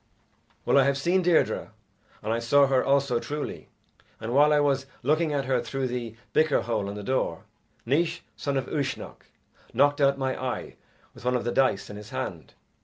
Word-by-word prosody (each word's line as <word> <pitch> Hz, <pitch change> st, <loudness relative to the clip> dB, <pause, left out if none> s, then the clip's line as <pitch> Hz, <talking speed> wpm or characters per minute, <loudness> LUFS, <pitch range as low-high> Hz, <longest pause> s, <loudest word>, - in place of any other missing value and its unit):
"Well, 140 Hz, -, +5 dB
I -, -, +6 dB
have 140 Hz, 0 st, +2 dB
seen 175 Hz, +7 st, +2 dB
Deirdre, 175 Hz, -2 st, +1 dB, 0.5 s
and 110 Hz, -, 0 dB
I 115 Hz, -, 0 dB
saw 140 Hz, +5 st, +4 dB
her 135 Hz, -1 st, +2 dB
also 135 Hz, -3 st, +2 dB
truly, 150 Hz, +3 st, -5 dB, 0.5 s
and 115 Hz, +2 st, -4 dB
while 145 Hz, +2 st, +5 dB
I 150 Hz, -, +4 dB
was 135 Hz, -2 st, +1 dB, 0.2 s
looking 155 Hz, +4 st, +2 dB
at 140 Hz, -2 st, -1 dB
her 130 Hz, -2 st, +1 dB
through 130 Hz, +1 st, -3 dB
the 120 Hz, -2 st, -4 dB, 0.2 s
bicker 155 Hz, -2 st, +3 dB
hole 110 Hz, -4 st, -1 dB
on 100 Hz, -, -6 dB
the 105 Hz, -, -6 dB
door, 100 Hz, -8 st, -1 dB, 0.4 s
Naois, 165 Hz, +7 st, +1 dB
son 140 Hz, -1 st, -2 dB
of 135 Hz, -, -1 dB
Uisnech, 140 Hz, -4 st, -4 dB, 0.5 s
knocked 145 Hz, +1 st, +3 dB
out 140 Hz, 0 st, +4 dB
my 130 Hz, -1 st, -2 dB
eye 130 Hz, -, -4 dB, 0.4 s
with -, -, -14 dB
one 125 Hz, 0 st, +1 dB
of 125 Hz, -, 0 dB
the 120 Hz, -, -1 dB
dice 130 Hz, -7 st, +2 dB
in 105 Hz, -, -8 dB
his 105 Hz, 0 st, -10 dB
hand. -, -, -5 dB
135 Hz, 190 wpm, -26 LUFS, 120-145 Hz, 0.5 s, I